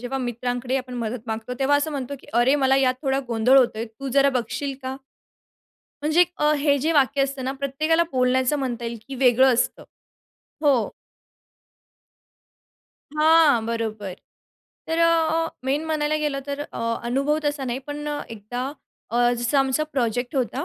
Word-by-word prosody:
जेव्हा 250 Hz, +2 st, -3 dB
मित्रांकडे 245 Hz, +1 st, -2 dB
आपण 255 Hz, -1 st, -5 dB
मदत 230 Hz, +1 st, -5 dB
मागतो, 225 Hz, +3 st, -4 dB
तेव्हा 280 Hz, +2 st, +3 dB
असं 290 Hz, +2 st, -1 dB
म्हणतो 280 Hz, -1 st, -4 dB
की -, -, -18 dB
अरे, 240 Hz, +4 st, +4 dB
मला 265 Hz, 0 st, +4 dB
यात 260 Hz, -1 st, +3 dB
थोडा 270 Hz, -1 st, +1 dB
गोंधळ 235 Hz, +4 st, +4 dB
होतोय, 230 Hz, -3 st, +1 dB
तू 240 Hz, +5 st, -8 dB
जरा 275 Hz, +2 st, +4 dB
बघशील 270 Hz, +4 st, -4 dB
का? 260 Hz, 0 st, -4 dB, 1.1 s
म्हणजे 310 Hz, +4 st, +3 dB
एक 355 Hz, 0 st, +3 dB
अ, 300 Hz, 0 st, +3 dB
हे 285 Hz, 0 st, +3 dB
जे 315 Hz, +5 st, 0 dB
वाक्य 280 Hz, -1 st, +3 dB
असतं 275 Hz, -1 st, -3 dB
ना, 265 Hz, -, -1 dB
प्रत्येकाला 280 Hz, +5 st, +1 dB
बोलण्याचं 255 Hz, +2 st, +2 dB
म्हणता 245 Hz, -3 st, -3 dB
येईल 230 Hz, 0 st, -4 dB
की 275 Hz, -, -6 dB
वेगळं 255 Hz, 0 st, +4 dB
असतं 235 Hz, -, -1 dB, 0.8 s
हो. 265 Hz, -6 st, +3 dB, 2.2 s
हां, 305 Hz, -5 st, +5 dB
बरोबर. 220 Hz, -4 st, -3 dB, 0.7 s
तर 325 Hz, +1 st, -1 dB
अ, 335 Hz, -, +5 dB, 0.4 s
अ -, -, -4 dB, 0.2 s
मेन 280 Hz, +4 st, 0 dB
म्हणायला 310 Hz, -1 st, 0 dB
गेलं 295 Hz, -2 st, -1 dB
तर 285 Hz, 0 st, -4 dB
अ, 290 Hz, -, -7 dB, 0.3 s
अनुभव 275 Hz, +5 st, +1 dB
तसा 290 Hz, -2 st, -1 dB
नाही, 245 Hz, 0 st, -2 dB
पण 295 Hz, 0 st, -5 dB
अ, 295 Hz, 0 st, -2 dB
एकदा 230 Hz, +3 st, -5 dB, 0.5 s
अ, 240 Hz, +1 st, +3 dB
जसं 240 Hz, +4 st, +1 dB
आमचा 270 Hz, +3 st, +1 dB
प्रोजेक्ट 245 Hz, +1 st, -1 dB
होता, 260 Hz, +2 st, -1 dB
265 Hz, 165 wpm, -23 LUFS, 245-290 Hz, 2.2 s, हां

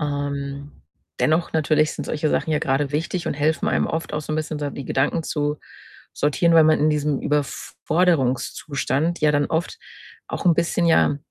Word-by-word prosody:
Ähm, 140 Hz, -1 st, -4 dB, 0.5 s
dennoch 160 Hz, +2 st, +1 dB
natürlich 155 Hz, -1 st, +2 dB
sind -, -, -6 dB
solche 150 Hz, 0 st, -1 dB
Sachen -, -, 0 dB
ja 150 Hz, -, +2 dB
grade 140 Hz, +1 st, 0 dB
wichtig 165 Hz, +3 st, -2 dB
und -, -, -1 dB
helfen 150 Hz, +1 st, 0 dB
einem -, -, +1 dB
oft 160 Hz, 0 st, -4 dB
auch 150 Hz, -, -1 dB
so 155 Hz, -, -5 dB
'n -, -, -1 dB
bisschen, 155 Hz, -1 st, -3 dB
so 145 Hz, -1 st, -3 dB
die 140 Hz, -1 st, -7 dB
Gedanken 145 Hz, +5 st, 0 dB
zu 150 Hz, -1 st, -2 dB, 0.5 s
sortieren, 160 Hz, +4 st, +1 dB
weil 160 Hz, -1 st, +7 dB
man 155 Hz, 0 st, +4 dB
in 155 Hz, +1 st, +3 dB
diesem 150 Hz, -2 st, 0 dB
Überforderungszustand 150 Hz, +1 st, -1 dB
ja 150 Hz, -1 st, +3 dB
dann 145 Hz, 0 st, +2 dB
oft 170 Hz, -, -2 dB, 0.5 s
auch -, -, -5 dB
'n 170 Hz, -, +6 dB
bisschen, 170 Hz, +1 st, +1 dB
ja, 160 Hz, -3 st, +4 dB
150 Hz, 180 wpm, -22 LUFS, 145-160 Hz, 0.5 s, weil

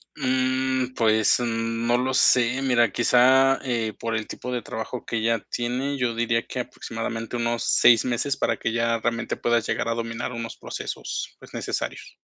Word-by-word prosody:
Mm, 130 Hz, 0 st, 0 dB
pues, 110 Hz, 0 st, +3 dB
mm, 115 Hz, 0 st, -2 dB
no 120 Hz, -, +3 dB
lo 130 Hz, +1 st, -1 dB
sé, 125 Hz, 0 st, +4 dB
mira, 120 Hz, -4 st, +3 dB
quizá, 130 Hz, +3 st, +4 dB
eh, 115 Hz, -4 st, -1 dB
por 115 Hz, -1 st, -2 dB
el 105 Hz, -1 st, -3 dB
tipo 125 Hz, -, -6 dB
de 125 Hz, -1 st, -2 dB
trabajo 110 Hz, +3 st, -6 dB
que 115 Hz, -, -2 dB
ella 115 Hz, 0 st, +1 dB
tiene, 125 Hz, +4 st, -2 dB
yo 125 Hz, -3 st, 0 dB
diría 115 Hz, 0 st, 0 dB
que 125 Hz, -, -5 dB
aproximadamente 115 Hz, -1 st, -5 dB
unos 120 Hz, 0 st, -1 dB
6 115 Hz, -1 st, +5 dB
meses 130 Hz, +3 st, -1 dB
para -, -, 0 dB
que 115 Hz, -, -2 dB
ya 115 Hz, 0 st, +1 dB
realmente 115 Hz, 0 st, -2 dB
puedas 120 Hz, -1 st, +1 dB
llegar -, -, -1 dB
a 115 Hz, -, 0 dB
dominar 115 Hz, +1 st, -4 dB
unos 115 Hz, -1 st, -5 dB
procesos, -, -, -5 dB
pues -, -, -15 dB
necesarios. -, -, -4 dB
120 Hz, 175 wpm, -24 LUFS, 115-125 Hz, -, 6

